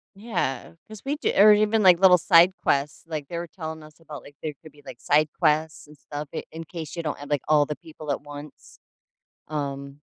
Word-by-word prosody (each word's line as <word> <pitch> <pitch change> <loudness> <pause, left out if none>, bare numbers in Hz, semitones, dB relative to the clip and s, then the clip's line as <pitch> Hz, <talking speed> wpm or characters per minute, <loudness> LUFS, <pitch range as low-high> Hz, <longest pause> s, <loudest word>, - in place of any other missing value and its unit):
Yeah, 185 - -3
'cause 215 -2 -11
we 280 +2 -2
do - - 0
or 210 +1 +8
even, 215 +1 +2
like, 180 -3 +6
little 185 -2 +6
side 170 +3 +6
quests, 140 +1 0
like, 155 -3 -5
they 170 - -5
were 175 - -6
telling 160 -2 -7
us 155 +1 -16
about, 155 -3 -10
like, 145 - -15
there 155 -1 -3
could 155 -2 -14
be, 145 -1 -21
like, 130 -2 -11
side 150 +1 +3
quests 155 0 0
and 150 - -16
stuff 145 +1 -7
in - - -5
in 165 +1 -7
case 160 -1 -8
you 170 - -3
don't 155 -2 -4
have, 145 0 -10
like, 145 - +1
all 150 -1 +4
the 150 - -5
people 155 -2 -8
at 140 - -2
once. 145 0 -12 0.7
Um, 140 -1 -5
155 Hz, 225 wpm, -25 LUFS, 145-170 Hz, 0.7 s, or